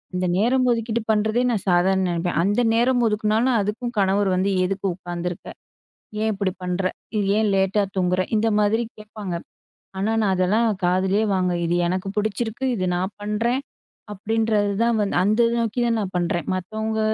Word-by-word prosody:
இந்த 180 Hz, 0 st, 0 dB
நேரம் 255 Hz, +5 st, +2 dB
ஒதுக்கீடு 230 Hz, 0 st, -1 dB
பண்ணுறதே, 220 Hz, +3 st, +1 dB
நான் 215 Hz, -5 st, -1 dB
சாதாரணம் 190 Hz, +2 st, +3 dB
நெனைப்பேன். 170 Hz, -1 st, -1 dB
அந்த 205 Hz, +6 st, +2 dB
நேரம் 245 Hz, +2 st, +3 dB
ஒதுக்குனாலும் 220 Hz, +3 st, +1 dB
அதுக்கும் 235 Hz, +4 st, -3 dB
கணவர் 195 Hz, 0 st, +2 dB
வந்து, 190 Hz, +2 st, +1 dB, 0.2 s
"எதுக்கு 195 Hz, +1 st, -3 dB
உட்காந்துருக்க? 175 Hz, -1 st, -5 dB, 0.7 s
ஏன் 220 Hz, 0 st, +1 dB
இப்டி 195 Hz, -1 st, -1 dB
பண்ற? 180 Hz, +1 st, -2 dB, 0.3 s
இது 205 Hz, -2 st, 0 dB
ஏன் 220 Hz, -1 st, +2 dB
லேட்டா 195 Hz, +2 st, +2 dB
தூங்குற?", 180 Hz, 0 st, +1 dB, 0.2 s
இந்த 225 Hz, +1 st, +1 dB
மாதிரி 215 Hz, +3 st, +2 dB
கேட்பாங்க. 210 Hz, -4 st, -6 dB, 0.6 s
ஆனா 205 Hz, +3 st, 0 dB
நான் 205 Hz, -3 st, +2 dB
அதெல்லாம் 200 Hz, +6 st, +2 dB, 0.2 s
காதுலயே 190 Hz, +3 st, +2 dB
வாங்கல 180 Hz, -1 st, +1 dB
"இது 170 Hz, +1 st, 0 dB
எனக்கு 185 Hz, +2 st, -2 dB
புடிச்சிருக்கு. 220 Hz, +4 st, -2 dB
இது 185 Hz, -4 st, -1 dB
நான் 185 Hz, +3 st, -2 dB
பண்றேன்", 230 Hz, +5 st, 0 dB, 0.5 s
அப்டின்றது 215 Hz, 0 st, 0 dB
தான் 235 Hz, -1 st, +2 dB
வந்து, 200 Hz, -, 0 dB
அந்த 215 Hz, +4 st, +2 dB, 0.2 s
நோக்கி 230 Hz, +1 st, -1 dB
தான் 230 Hz, -1 st, +1 dB
நான் 190 Hz, -2 st, -5 dB
பண்றேன். 175 Hz, -2 st, -1 dB
மத்தவங்க 220 Hz, +4 st, -3 dB
205 Hz, 160 wpm, -23 LUFS, 185-220 Hz, 0.7 s, சாதாரணம்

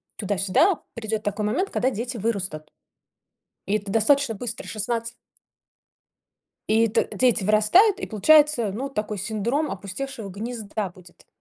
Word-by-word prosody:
туда-сюда, 200 Hz, -, +2 dB
придет 220 Hz, -2 st, -3 dB
такой 205 Hz, +1 st, -2 dB
момент, 285 Hz, -, 0 dB
когда 255 Hz, -, +1 dB
дети 245 Hz, +2 st, -4 dB
вырастут. 190 Hz, -8 st, -3 dB, 1.0 s
И 200 Hz, -, 0 dB
это 200 Hz, -1 st, -7 dB
достаточно 240 Hz, +4 st, +3 dB
быстр- 230 Hz, +2 st, -6 dB
16 230 Hz, +2 st, -3 dB, 1.6 s
и 225 Hz, +1 st, +4 dB
т -, -, +1 dB
дети 240 Hz, -5 st, +2 dB
вырастают, 215 Hz, -, +4 dB
и -, -, -3 dB
получается, 250 Hz, 0 st, +4 dB
ну, 255 Hz, +7 st, -4 dB
такой 210 Hz, -5 st, -4 dB
синдром 220 Hz, -, -1 dB
опустевшего 205 Hz, +4 st, -6 dB
гнезда 215 Hz, 0 st, -5 dB
будет. 175 Hz, 0 st, -18 dB
220 Hz, 125 wpm, -24 LUFS, 200-250 Hz, 1.6 s, и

